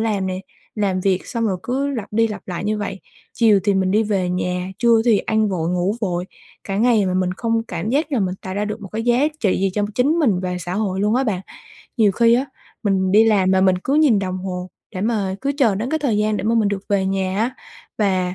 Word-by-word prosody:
làm 210 Hz, -4 st, 0 dB
nè, 185 Hz, 0 st, -3 dB, 0.3 s
làm 195 Hz, -3 st, 0 dB
việc 185 Hz, -1 st, 0 dB
xong 230 Hz, -2 st, -1 dB
rồi 190 Hz, -, 0 dB
cứ 270 Hz, +3 st, -1 dB
lặp 230 Hz, -7 st, -4 dB
đi 225 Hz, +1 st, +2 dB
lặp 210 Hz, -, -6 dB
lại 180 Hz, +2 st, -4 dB
như 215 Hz, 0 st, 0 dB
vậy, 200 Hz, -2 st, -4 dB, 0.3 s
chiều 220 Hz, -4 st, +4 dB
thì 205 Hz, -, +2 dB
mình 190 Hz, -1 st, +1 dB
đi 215 Hz, +3 st, +3 dB
về 195 Hz, -4 st, 0 dB
nhà, 180 Hz, 0 st, -2 dB
trưa 235 Hz, -2 st, +4 dB
thì 230 Hz, -4 st, +4 dB
ăn 220 Hz, +1 st, +1 dB
vội, 170 Hz, -4 st, -1 dB
ngủ 180 Hz, +4 st, 0 dB
vội 180 Hz, -4 st, -1 dB, 0.4 s
cả 195 Hz, -, -3 dB
ngày, 220 Hz, -2 st, +3 dB
mà 185 Hz, -, -1 dB
mình 185 Hz, -1 st, +1 dB
không 230 Hz, +2 st, 0 dB
cảm 175 Hz, +5 st, -3 dB
giác 295 Hz, +4 st, 0 dB
là 255 Hz, -, +1 dB
mình 185 Hz, -2 st, -1 dB
tạo 185 Hz, -, -5 dB
ra 205 Hz, +1 st, -1 dB
được 210 Hz, +1 st, -5 dB
một 195 Hz, -, -7 dB
cái 220 Hz, +1 st, -2 dB
giá 240 Hz, +3 st, +3 dB, 0.2 s
trị 200 Hz, -6 st, +1 dB
gì 195 Hz, 0 st, +1 dB
cho 210 Hz, -, 0 dB
chính 250 Hz, +5 st, +2 dB
mình 220 Hz, -, +2 dB
và 180 Hz, -1 st, -3 dB
xã 175 Hz, +1 st, -4 dB
hội 195 Hz, -2 st, -1 dB
luôn 210 Hz, +2 st, +2 dB
á 260 Hz, +2 st, +2 dB
bạn. 200 Hz, -7 st, -1 dB, 0.6 s
Nhiều 215 Hz, -5 st, +4 dB
khi 230 Hz, +3 st, +4 dB
á 260 Hz, +3 st, +1 dB, 0.4 s
mình 190 Hz, -3 st, +1 dB
đi 220 Hz, +2 st, +6 dB
làm 200 Hz, -4 st, +3 dB
mà 190 Hz, 0 st, +3 dB
mình 185 Hz, -1 st, +3 dB
cứ 265 Hz, +9 st, -1 dB
nhìn 295 Hz, -8 st, +4 dB
đồng 185 Hz, -1 st, -2 dB
hồ 180 Hz, -1 st, -5 dB, 0.3 s
để 185 Hz, -, -3 dB
mà 205 Hz, -3 st, 0 dB
cứ 280 Hz, +1 st, -1 dB
chờ 230 Hz, -8 st, +4 dB
đến 225 Hz, +6 st, -3 dB
cái 315 Hz, -, +1 dB
thời 270 Hz, -8 st, 0 dB
gian 210 Hz, 0 st, +1 dB
để 200 Hz, -, -4 dB
mà 225 Hz, +2 st, +2 dB
mình 220 Hz, -3 st, +3 dB
được 200 Hz, -1 st, -3 dB
về 195 Hz, -2 st, +1 dB
nhà 190 Hz, 0 st, -1 dB
á. 230 Hz, +3 st, +1 dB, 0.5 s
Và 185 Hz, -3 st, +1 dB
205 Hz, 260 wpm, -20 LUFS, 185-225 Hz, 0.6 s, đi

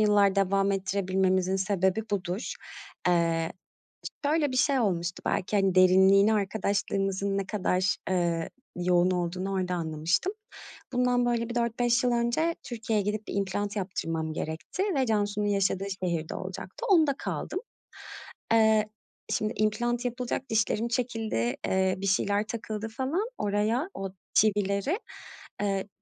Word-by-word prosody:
yıllar 205 Hz, -2 st, +4 dB
devam 195 Hz, 0 st, +2 dB
ettirebilmemizin 190 Hz, -1 st, +1 dB
sebebi 190 Hz, +1 st, +1 dB
budur. 185 Hz, +1 st, -2 dB, 0.6 s
Eee, 165 Hz, -1 st, +2 dB, 0.7 s
şöyle 295 Hz, -1 st, +2 dB
bir 255 Hz, -, -1 dB
şey 270 Hz, 0 st, +3 dB
olmuştu. 175 Hz, -5 st, -1 dB
Belki, 200 Hz, +3 st, 0 dB
hani, 195 Hz, -2 st, +2 dB
derinliğini, 190 Hz, +3 st, +6 dB
arkadaşlığımızın 200 Hz, -1 st, 0 dB
ne 195 Hz, -, -1 dB
kadar, 185 Hz, -3 st, +1 dB
ııı, 170 Hz, -3 st, 0 dB, 0.3 s
yoğun 180 Hz, 0 st, +3 dB
olduğunu 180 Hz, +2 st, -2 dB
orada 185 Hz, -1 st, -1 dB
anlamıştım. 165 Hz, -, 0 dB, 0.6 s
Bundan 245 Hz, 0 st, +2 dB
böyle 235 Hz, -1 st, 0 dB
bir 240 Hz, -, -5 dB
4-5 240 Hz, +1 st, +1 dB
yıl 245 Hz, -, +3 dB
önce 240 Hz, +8 st, +1 dB
Türkiye’ye 225 Hz, -4 st, -1 dB
gidip 210 Hz, +1 st, -2 dB
bir -, -, -5 dB
implant 200 Hz, +1 st, -1 dB
yaptırmam 165 Hz, -5 st, -2 dB
gerekti 160 Hz, -, -3 dB
ve 265 Hz, -1 st, +2 dB
Cansu’nun 210 Hz, -1 st, 0 dB
yaşadığı 195 Hz, -1 st, +1 dB, 0.2 s
şehirde 165 Hz, -3 st, -2 dB
olacaktı. -, -, -6 dB
Onda 315 Hz, -6 st, +5 dB
kaldım. -, -, -3 dB, 0.9 s
Eee, 220 Hz, -1 st, +5 dB, 0.4 s
şimdi, 215 Hz, 0 st, 0 dB
implant 240 Hz, +3 st, 0 dB
yapılacak 250 Hz, +1 st, -3 dB
dişlerim 220 Hz, +1 st, +1 dB
çekildi, 225 Hz, -, -1 dB
eee, 190 Hz, 0 st, +2 dB
bir 195 Hz, -, -5 dB
şeyler 205 Hz, +2 st, +1 dB
takıldı 220 Hz, -1 st, -4 dB
falan 275 Hz, -, -1 dB
oraya, 215 Hz, -, 0 dB
o 195 Hz, -1 st, -4 dB, 0.2 s
çivileri. 205 Hz, -, +2 dB, 0.6 s
Eee, 195 Hz, -1 st, -1 dB
200 Hz, 125 wpm, -28 LUFS, 185-230 Hz, 0.9 s, derinliğini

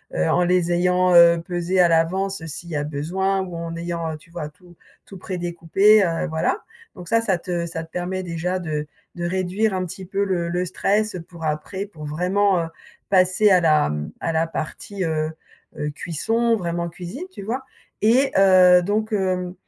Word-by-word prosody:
heu, 80 Hz, 0 st, +1 dB
en 180 Hz, -, +3 dB
les 175 Hz, -1 st, +2 dB
ayant, 180 Hz, +1 st, +3 dB
heu, 170 Hz, -1 st, +7 dB
pesés 180 Hz, 0 st, 0 dB
à 175 Hz, -, +5 dB
l'avance 175 Hz, +2 st, 0 dB
s'il 165 Hz, +2 st, -8 dB
y 155 Hz, -, -2 dB
a 145 Hz, -, -1 dB
besoin 185 Hz, +7 st, -1 dB
ou 180 Hz, -2 st, -6 dB
en 165 Hz, 0 st, -5 dB
ayant, 170 Hz, -1 st, -3 dB
heu, -, -, -6 dB
tu 155 Hz, -, -22 dB
vois, 170 Hz, -3 st, -5 dB
tout 175 Hz, +3 st, -20 dB, 0.3 s
tout 195 Hz, -, -11 dB
prédécoupé, 180 Hz, +3 st, +2 dB
heu, 170 Hz, +1 st, -1 dB
voilà. 160 Hz, -, -1 dB, 0.3 s
Donc 180 Hz, -3 st, -10 dB
ça 230 Hz, -, +4 dB
ça 195 Hz, -6 st, +1 dB
te 175 Hz, -1 st, -3 dB
ça 165 Hz, -1 st, -5 dB
te 160 Hz, -, -16 dB
permet 185 Hz, +1 st, -3 dB
déjà 180 Hz, +1 st, -2 dB
de 150 Hz, -3 st, -3 dB, 0.3 s
de 175 Hz, 0 st, -4 dB
réduire 190 Hz, +4 st, 0 dB
un 185 Hz, -1 st, -1 dB
petit 185 Hz, +2 st, -8 dB
peu 195 Hz, +2 st, -1 dB
le 180 Hz, -4 st, -1 dB
le 175 Hz, +1 st, -1 dB
stress, 205 Hz, +4 st, 0 dB
heu, 180 Hz, -, -5 dB
pour 165 Hz, 0 st, -12 dB
après 155 Hz, +6 st, -3 dB
pour 165 Hz, -7 st, -11 dB
vraiment, 180 Hz, +4 st, +1 dB
heu, -, -, -4 dB, 0.4 s
passer 185 Hz, +2 st, +4 dB
à 185 Hz, -, +6 dB
la, 155 Hz, -, +3 dB
mmh, 75 Hz, 0 st, -4 dB
à -, -, -1 dB
la 160 Hz, +1 st, +1 dB
partie, 185 Hz, +5 st, -5 dB
heu, 155 Hz, -1 st, -1 dB, 0.5 s
heu, 150 Hz, -, -2 dB
cuisson, 225 Hz, +10 st, 0 dB
vraiment 170 Hz, -2 st, -2 dB
cuisine, 180 Hz, -, -7 dB
tu 200 Hz, -, -9 dB
vois? 245 Hz, +6 st, -3 dB, 0.4 s
Et 245 Hz, +6 st, +4 dB
heu, 185 Hz, -2 st, +7 dB
donc, 215 Hz, +3 st, -1 dB
hem, 185 Hz, -3 st, -1 dB
180 Hz, 195 wpm, -22 LUFS, 165-190 Hz, 0.5 s, heu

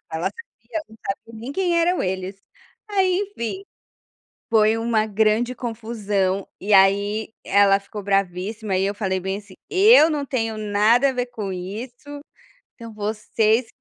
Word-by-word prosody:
ela 165 Hz, -, -3 dB
sabia, 465 Hz, -8 st, -8 dB
não 220 Hz, -, -16 dB
sabia 225 Hz, +3 st, -5 dB
nem 250 Hz, +5 st, -6 dB
quem 350 Hz, -1 st, +1 dB
eram 350 Hz, +1 st, +2 dB
eles, 190 Hz, +1 st, -3 dB, 0.5 s
aí, 380 Hz, -3 st, +2 dB, 0.2 s
enfim, 305 Hz, -, -4 dB, 0.9 s
foi 220 Hz, -1 st, +4 dB
uma 225 Hz, -1 st, +1 dB
grande 220 Hz, +4 st, +1 dB
confusão 210 Hz, -5 st, -2 dB
e 205 Hz, +2 st, -3 dB
aí 200 Hz, +3 st, +3 dB
ela 200 Hz, 0 st, +4 dB
ficou 205 Hz, +1 st, -8 dB
bravíssima 195 Hz, +2 st, -1 dB
e 190 Hz, -, +1 dB
eu 200 Hz, -, -1 dB
falei 190 Hz, -3 st, -1 dB
bem 190 Hz, +1 st, -3 dB
assim: 200 Hz, -2 st, -13 dB
"Eu 400 Hz, -3 st, +6 dB
não 295 Hz, -3 st, -2 dB
tenho 225 Hz, -5 st, -2 dB
nada 215 Hz, +5 st, +3 dB
a -, -, -3 dB
ver 250 Hz, -1 st, -1 dB
com 215 Hz, -5 st, -5 dB
isso, 240 Hz, +10 st, -7 dB, 0.5 s
então 230 Hz, -2 st, -10 dB
vocês 215 Hz, +2 st, 0 dB
220 Hz, 150 wpm, -22 LUFS, 200-245 Hz, 0.9 s, Eu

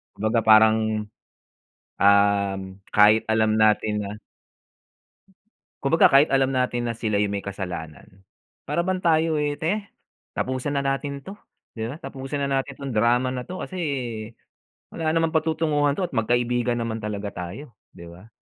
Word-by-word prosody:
Kumbaga 110 Hz, +2 st, 0 dB
parang, 110 Hz, -1 st, +4 dB, 0.9 s
um, 100 Hz, -1 st, +3 dB, 0.3 s
kahit 105 Hz, +1 st, +6 dB
alam 110 Hz, -1 st, +2 dB
natin 105 Hz, -1 st, +2 dB
na 100 Hz, +1 st, -6 dB, 1.6 s
Kumbaga 160 Hz, +4 st, +4 dB
kahit 140 Hz, +3 st, +6 dB
alam 135 Hz, 0 st, +2 dB
natin 125 Hz, -1 st, 0 dB
na 115 Hz, -, -2 dB
sila 110 Hz, -2 st, -1 dB
'yung 100 Hz, 0 st, 0 dB
may 100 Hz, -, -2 dB
kasalanan, 90 Hz, -2 st, -7 dB, 0.5 s
para 170 Hz, -, 0 dB
bang 185 Hz, -1 st, -1 dB
tayo 160 Hz, -2 st, +2 dB
eh, 145 Hz, 0 st, -1 dB
“Teh, 195 Hz, +7 st, -1 dB, 0.5 s
tapusan 130 Hz, +3 st, -2 dB
na 140 Hz, -, 0 dB
natin 140 Hz, 0 st, -2 dB
‘to.” 195 Hz, -, -8 dB, 0.4 s
‘Di 110 Hz, 0 st, -4 dB
ba? 140 Hz, -, -7 dB
“Tapusin 135 Hz, -2 st, -6 dB
na 140 Hz, -, -1 dB
natin 140 Hz, 0 st, -11 dB
‘tong 140 Hz, -3 st, -5 dB
drama 120 Hz, +4 st, +2 dB
na 125 Hz, -, -3 dB
‘to 185 Hz, +1 st, -6 dB
kasi 185 Hz, -, -7 dB, 1.2 s
wala 160 Hz, -1 st, -1 dB
namang 165 Hz, 0 st, +1 dB
patutunguhan 155 Hz, -2 st, +1 dB
‘to, 185 Hz, -2 st, -1 dB
at -, -, -11 dB
magkaibigan 120 Hz, +1 st, 0 dB
naman 115 Hz, -1 st, -3 dB
talaga 105 Hz, -1 st, -4 dB, 0.2 s
tayo,” 135 Hz, 0 st, -11 dB, 0.2 s
‘di 85 Hz, -, -12 dB
ba? 90 Hz, +7 st, -14 dB
120 Hz, 150 wpm, -24 LUFS, 105-145 Hz, 1.6 s, kahit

